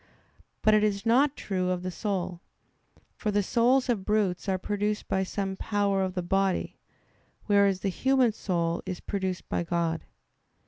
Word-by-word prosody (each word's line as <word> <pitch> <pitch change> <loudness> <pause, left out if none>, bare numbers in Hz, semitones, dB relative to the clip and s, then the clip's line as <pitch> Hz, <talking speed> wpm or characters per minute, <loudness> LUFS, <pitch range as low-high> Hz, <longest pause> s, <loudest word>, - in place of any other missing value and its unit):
But 215 - +5
it 215 0 +4
is 200 -1 0
not 265 +5 +4
true 185 -2 -1
of 180 -1 -1
the 185 - -3
soul. 185 -3 -3 0.7
For 215 - -2
the 205 0 +2
souls 250 +6 +3
of 230 -6 0
brutes 205 -2 0
are 190 - +1
produced 210 +2 -2
by 190 - +1
some 190 0 -2
power 200 -1 0
of 190 0 -2
the 180 - -1
body; 195 +1 0 0.7
whereas 200 -2 +3
the 195 - 0
human 260 +4 +2
soul 170 -5 -1
is 185 -2 -4
produced 190 -3 -3
by - - -1
God. 170 -1 -1
195 Hz, 165 wpm, -28 LUFS, 185-210 Hz, 0.7 s, But